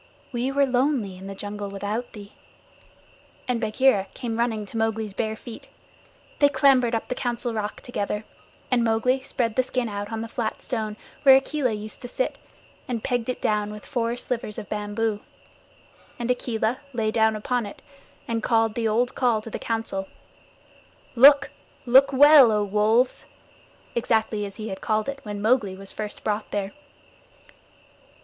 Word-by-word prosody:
"We 250 Hz, +1 st, -1 dB
were 280 Hz, 0 st, +3 dB
lonely 250 Hz, -6 st, 0 dB
in 190 Hz, +1 st, -10 dB
the 195 Hz, -, -6 dB
jungle 205 Hz, +1 st, -5 dB
without 205 Hz, +5 st, -4 dB
thee," 205 Hz, -1 st, -11 dB, 1.1 s
and 245 Hz, -2 st, 0 dB
Bagheera 220 Hz, -2 st, +2 dB
came 235 Hz, -3 st, -4 dB
running 225 Hz, -3 st, 0 dB
to 225 Hz, -, -7 dB
Mowgli's 220 Hz, -2 st, -1 dB
bare 220 Hz, +2 st, -2 dB
feet. 230 Hz, +1 st, -11 dB, 0.7 s
They 285 Hz, -, +6 dB
clambered 265 Hz, -4 st, +4 dB
up 225 Hz, -, -3 dB
the -, -, -2 dB
Council 240 Hz, -2 st, -2 dB
Rock 210 Hz, -1 st, -4 dB
together, 210 Hz, -3 st, -3 dB, 0.5 s
and 245 Hz, -2 st, +3 dB
Mowgli 230 Hz, +4 st, +2 dB
spread 230 Hz, -4 st, -2 dB
the -, -, +4 dB
skin 255 Hz, -1 st, -2 dB
out 205 Hz, 0 st, -5 dB
on 225 Hz, 0 st, -3 dB
the 230 Hz, -, -4 dB
flat 225 Hz, -1 st, -4 dB
stone 215 Hz, -3 st, -3 dB, 0.2 s
where 270 Hz, -2 st, +8 dB
Akela 270 Hz, -2 st, +1 dB
used 215 Hz, 0 st, -6 dB
to 245 Hz, -, -6 dB
sit, -, -, -2 dB, 0.5 s
and 235 Hz, -3 st, -3 dB
pegged 245 Hz, -2 st, -1 dB
it 250 Hz, -, -3 dB
down 210 Hz, -1 st, +1 dB
with 210 Hz, 0 st, -9 dB
four 235 Hz, -2 st, -1 dB
slivers 235 Hz, -4 st, -4 dB
of 205 Hz, -, -7 dB
bamboo, 210 Hz, +1 st, -2 dB, 1.0 s
and 240 Hz, +1 st, -1 dB
Akela 240 Hz, 0 st, -1 dB
lay 220 Hz, -2 st, 0 dB
down 220 Hz, -1 st, +3 dB
upon 235 Hz, +1 st, -1 dB
it, 200 Hz, -, -11 dB, 0.5 s
and 230 Hz, -1 st, -1 dB
called 225 Hz, -1 st, +2 dB
the 230 Hz, 0 st, -1 dB
old 235 Hz, +3 st, +1 dB
call 240 Hz, -4 st, +2 dB
to 225 Hz, -, -9 dB
the -, -, -4 dB
Council, 225 Hz, -4 st, -3 dB, 1.1 s
"Look 280 Hz, +3 st, +7 dB, 0.3 s
look 265 Hz, +3 st, +6 dB
well, 280 Hz, -2 st, +8 dB
O 210 Hz, -1 st, +2 dB
Wolves," 215 Hz, +5 st, +1 dB, 0.7 s
exactly 220 Hz, -3 st, 0 dB
as 195 Hz, -, -11 dB
he 220 Hz, -1 st, -6 dB
had 190 Hz, -1 st, -6 dB
called 215 Hz, +2 st, 0 dB
when 205 Hz, -1 st, -6 dB
Mowgli 215 Hz, -4 st, +2 dB
was 195 Hz, 0 st, -8 dB
first 210 Hz, -1 st, -6 dB
brought 210 Hz, 0 st, -2 dB
there. 200 Hz, -1 st, -2 dB
225 Hz, 165 wpm, -25 LUFS, 210-250 Hz, 1.1 s, where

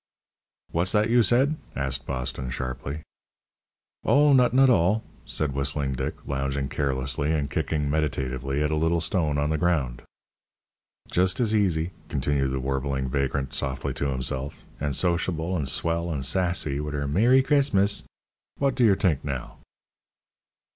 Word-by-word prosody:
"What's 85 Hz, +3 st, +1 dB
that 105 Hz, +2 st, +2 dB
you 120 Hz, 0 st, +6 dB
said?" 130 Hz, +8 st, +3 dB, 0.2 s
asked 65 Hz, 0 st, -3 dB
Boston, 65 Hz, -1 st, -3 dB
sharply. 65 Hz, +4 st, -5 dB, 1.0 s
"Oh, 145 Hz, 0 st, +5 dB
nuttin' 130 Hz, +1 st, +5 dB
't 130 Hz, -, +5 dB
all," 100 Hz, +2 st, +3 dB, 0.2 s
said 75 Hz, -3 st, -1 dB
Whistling 70 Hz, 0 st, -1 dB
Dick, 65 Hz, +1 st, -3 dB
lounging 70 Hz, 0 st, -2 dB
carelessly, 70 Hz, +1 st, -1 dB
and 75 Hz, -3 st, -1 dB
kicking 80 Hz, -2 st, -1 dB
meditatively 70 Hz, -2 st, -1 dB
at 75 Hz, -, 0 dB
a -, -, +1 dB
little 80 Hz, +2 st, +1 dB
stone 80 Hz, -2 st, +1 dB
on 75 Hz, +1 st, 0 dB
the 80 Hz, -, 0 dB
ground. 70 Hz, -9 st, 0 dB, 1.1 s
"Just 90 Hz, +4 st, +2 dB
as 115 Hz, -3 st, +1 dB
easy," 90 Hz, -5 st, +1 dB, 0.2 s
continued 70 Hz, 0 st, 0 dB
the 65 Hz, 0 st, -2 dB
warbling 65 Hz, 0 st, -2 dB
vagrant 70 Hz, -1 st, -1 dB
softly 65 Hz, 0 st, -2 dB
to 70 Hz, +2 st, -2 dB
himself, 65 Hz, +1 st, -3 dB, 0.2 s
"an' 70 Hz, -1 st, -1 dB
sociable 85 Hz, +1 st, 0 dB
an' 75 Hz, -6 st, -1 dB
swell 85 Hz, +4 st, 0 dB
an' 70 Hz, -4 st, -3 dB
sassy, 85 Hz, -3 st, 0 dB
wit' 75 Hz, 0 st, -4 dB
her 70 Hz, -1 st, -2 dB
'Mer 110 Hz, -, +3 dB
ry 135 Hz, -, +7 dB
Chris 140 Hz, 0 st, +2 dB
mus,' 100 Hz, +1 st, +2 dB, 0.6 s
Wot 140 Hz, -2 st, +1 dB
d'yer 120 Hz, -6 st, +4 dB
t'ink, 90 Hz, -8 st, +1 dB
now!" 65 Hz, -4 st, -5 dB
75 Hz, 150 wpm, -26 LUFS, 70-90 Hz, 1.1 s, ry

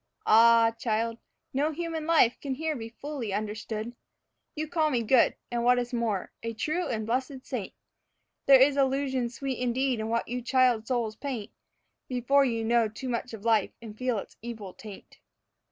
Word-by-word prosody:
Ah, 230 Hz, +1 st, +6 dB
child, 230 Hz, 0 st, -1 dB, 0.3 s
no 290 Hz, +4 st, +1 dB
human 325 Hz, 0 st, -4 dB
life 315 Hz, -8 st, +4 dB
can 275 Hz, -2 st, -3 dB
here 315 Hz, +2 st, -2 dB
be 225 Hz, -3 st, -6 dB
fully 260 Hz, -2 st, -6 dB
understood. 215 Hz, +3 st, -4 dB, 0.6 s
You 310 Hz, 0 st, -3 dB
call 315 Hz, -1 st, +1 dB
me 245 Hz, -5 st, 0 dB
good, 240 Hz, +2 st, +4 dB, 0.2 s
and 240 Hz, -1 st, -1 dB
what 245 Hz, +1 st, +5 dB
is 245 Hz, 0 st, -2 dB
more, 225 Hz, -6 st, -1 dB
a 230 Hz, 0 st, -4 dB
'true 315 Hz, +9 st, -1 dB
and 220 Hz, -3 st, -2 dB
blessed 255 Hz, +3 st, -2 dB
saint.' 240 Hz, -8 st, -5 dB, 0.7 s
(There 270 Hz, -1 st, +9 dB
is 275 Hz, +2 st, +5 dB
illusion 265 Hz, -2 st, +1 dB
sweet 265 Hz, +1 st, -4 dB
indeed 250 Hz, 0 st, 0 dB
in 220 Hz, 0 st, -3 dB
what 230 Hz, +1 st, 0 dB
you 245 Hz, +1 st, -3 dB
child 245 Hz, -3 st, +2 dB
souls 235 Hz, -4 st, -1 dB
paint 250 Hz, -5 st, -5 dB, 0.6 s
Before 260 Hz, +3 st, +3 dB
you 230 Hz, -4 st, -1 dB
know 235 Hz, 0 st, +3 dB
too 235 Hz, +5 st, -7 dB
much 245 Hz, +1 st, -3 dB
of 215 Hz, 0 st, -13 dB
life 220 Hz, -4 st, +2 dB
and 220 Hz, -2 st, -10 dB
feel 250 Hz, 0 st, -1 dB
its -, -, -8 dB
evil 220 Hz, -5 st, -7 dB
taint.) 210 Hz, -3 st, -12 dB
240 Hz, 175 wpm, -28 LUFS, 225-270 Hz, 0.7 s, There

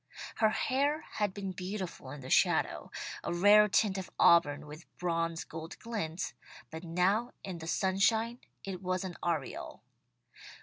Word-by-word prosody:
Her 220 Hz, -, +4 dB
hair 280 Hz, +7 st, +1 dB
had 210 Hz, -2 st, -2 dB
been 195 Hz, 0 st, -5 dB
beautiful 185 Hz, -6 st, -5 dB
in 145 Hz, +1 st, -8 dB
the 130 Hz, -, -8 dB
shadow; -, -, +2 dB, 0.3 s
a -, -, -2 dB
rare 205 Hz, +4 st, +6 dB
tint 200 Hz, -1 st, +2 dB
of 185 Hz, -, -7 dB
auburn 150 Hz, -4 st, +5 dB
with 150 Hz, +3 st, -11 dB
bronze 165 Hz, -1 st, -1 dB
gold 160 Hz, 0 st, -8 dB
glints, 190 Hz, -7 st, -4 dB, 0.4 s
but 160 Hz, +1 st, -7 dB
now 185 Hz, +8 st, +1 dB
in 185 Hz, -3 st, -5 dB
the 160 Hz, -, -7 dB
sunshine 220 Hz, +6 st, +2 dB, 0.2 s
it 190 Hz, -2 st, -5 dB
was 185 Hz, 0 st, -1 dB
an 185 Hz, -2 st, -5 dB
aureole. 160 Hz, -6 st, -3 dB
185 Hz, 145 wpm, -32 LUFS, 165-210 Hz, 0.4 s, rare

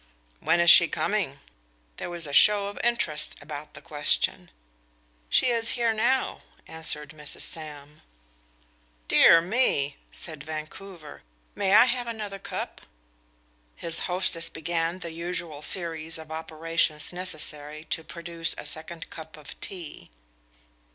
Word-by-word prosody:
"When 170 Hz, -, +3 dB
is 170 Hz, -1 st, +9 dB
she -, -, +9 dB
coming?" -, -, -1 dB, 0.6 s
There -, -, -4 dB
was 170 Hz, -1 st, -3 dB
a 145 Hz, -, -5 dB
show 205 Hz, +5 st, +7 dB
of 205 Hz, -, -8 dB
interest 205 Hz, -11 st, 0 dB
about 150 Hz, 0 st, -8 dB
the -, -, -11 dB
question. 145 Hz, -1 st, 0 dB, 0.8 s
"She 255 Hz, -, +4 dB
is 230 Hz, 0 st, +1 dB
here 235 Hz, -2 st, +3 dB
now," 260 Hz, +4 st, +1 dB, 0.3 s
answered 155 Hz, -2 st, -4 dB
Mrs. 150 Hz, -2 st, -8 dB
Sam. 150 Hz, -2 st, -6 dB, 1.1 s
"Dear 165 Hz, -, +8 dB
me!" 170 Hz, -, +1 dB
said 155 Hz, -4 st, -8 dB
Vancouver. 155 Hz, +1 st, -8 dB, 0.3 s
"May 200 Hz, 0 st, +3 dB
I 230 Hz, -, +9 dB
have 245 Hz, -1 st, -1 dB
another 210 Hz, -4 st, -5 dB
cup?" -, -, -5 dB, 0.9 s
His 165 Hz, -1 st, -3 dB
hostess 180 Hz, -2 st, +2 dB
began 165 Hz, +1 st, -1 dB
the 170 Hz, -3 st, -6 dB
usual 170 Hz, -2 st, -4 dB
series 165 Hz, 0 st, -1 dB
of 160 Hz, -1 st, -10 dB
operations 160 Hz, 0 st, 0 dB
necessary 155 Hz, -4 st, -4 dB
to 165 Hz, -, 0 dB
produce 170 Hz, 0 st, -4 dB
a -, -, -7 dB
second 160 Hz, +2 st, -6 dB
cup 160 Hz, -1 st, -9 dB
of 150 Hz, -, -11 dB
tea. 165 Hz, -, -8 dB
165 Hz, 130 wpm, -27 LUFS, 155-185 Hz, 1.1 s, is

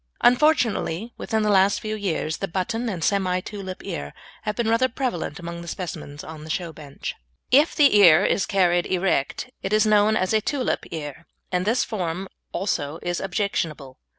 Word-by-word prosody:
Unfortunately, 240 Hz, -, +2 dB
within 220 Hz, -1 st, 0 dB
the 210 Hz, -, +2 dB
last 195 Hz, 0 st, +4 dB
few 215 Hz, -1 st, -4 dB
years 165 Hz, -6 st, -2 dB
the 195 Hz, -, -3 dB
"button" 225 Hz, +7 st, -2 dB
and 180 Hz, -6 st, -4 dB
"semi 185 Hz, -2 st, +1 dB
tulip" 190 Hz, -1 st, -7 dB
ear 70 Hz, 0 st, -5 dB, 0.3 s
have 210 Hz, -1 st, -3 dB
been 235 Hz, -2 st, -1 dB
rather 230 Hz, +3 st, +3 dB
prevalent 200 Hz, -, -3 dB
amongst 170 Hz, 0 st, -6 dB
the 170 Hz, -, -9 dB
specimens 155 Hz, -5 st, -6 dB
on 155 Hz, -1 st, -9 dB
the 155 Hz, -, -10 dB
show 170 Hz, 0 st, -3 dB
bench. 145 Hz, -3 st, -7 dB, 0.4 s
If 290 Hz, +6 st, +5 dB
the 285 Hz, -7 st, +5 dB
ear 180 Hz, -2 st, +7 dB
is -, -, +1 dB
carried 175 Hz, -3 st, +2 dB
erect 185 Hz, -, 0 dB
it 190 Hz, -, -3 dB
is 215 Hz, +1 st, +4 dB
known 215 Hz, 0 st, +4 dB
as 185 Hz, +1 st, 0 dB
a 215 Hz, -, +3 dB
"tulip" 260 Hz, +3 st, -1 dB
ear, 155 Hz, +1 st, -7 dB, 0.2 s
and 180 Hz, 0 st, 0 dB
this 235 Hz, +3 st, +3 dB
form 185 Hz, -3 st, -3 dB, 0.2 s
also 155 Hz, -6 st, -2 dB
is 175 Hz, 0 st, -1 dB
objectionable. 170 Hz, -, -2 dB
190 Hz, 180 wpm, -24 LUFS, 170-215 Hz, 0.4 s, ear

